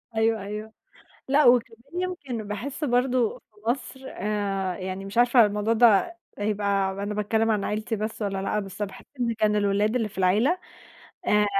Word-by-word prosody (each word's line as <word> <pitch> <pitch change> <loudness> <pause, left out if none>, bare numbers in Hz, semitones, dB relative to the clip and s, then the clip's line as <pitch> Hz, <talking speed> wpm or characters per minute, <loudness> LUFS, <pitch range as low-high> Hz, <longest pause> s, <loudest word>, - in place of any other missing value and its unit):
أيوه، 220 -1 +2
أيوه 210 +2 -6 0.6
لأ 290 +2 +4
وكمان 240 +6 +2
يمكن 275 - -4
باحس 270 +9 -4
برضه 250 -2 +1
في 210 - -35
مصر 265 +1 -4
آآ، 195 -2 -2
يعني 190 +1 -5
مش 195 +4 -5
عارفة 240 -2 +6
الموضوع 210 +2 0
ده 235 - +4 0.2
يبقى 200 -2 0
أنا 200 +2 -4
باتكلّم 220 +2 +1
عن 210 -2 +1
عيلتي 215 +2 -2
بس 215 +1 -4
والَّا 195 -1 -2
لأ، 210 +2 0
بس 195 +1 -7
باحس 195 - -6 0.2
إن 235 -1 +1
كان 210 -1 +2
الولاد 205 +3 +2
اللي 225 -3 0
في 200 -1 -13
العيلة 215 - +3 0.7
آآ، 210 0 +4
215 Hz, 165 wpm, -26 LUFS, 205-240 Hz, 0.7 s, عارفة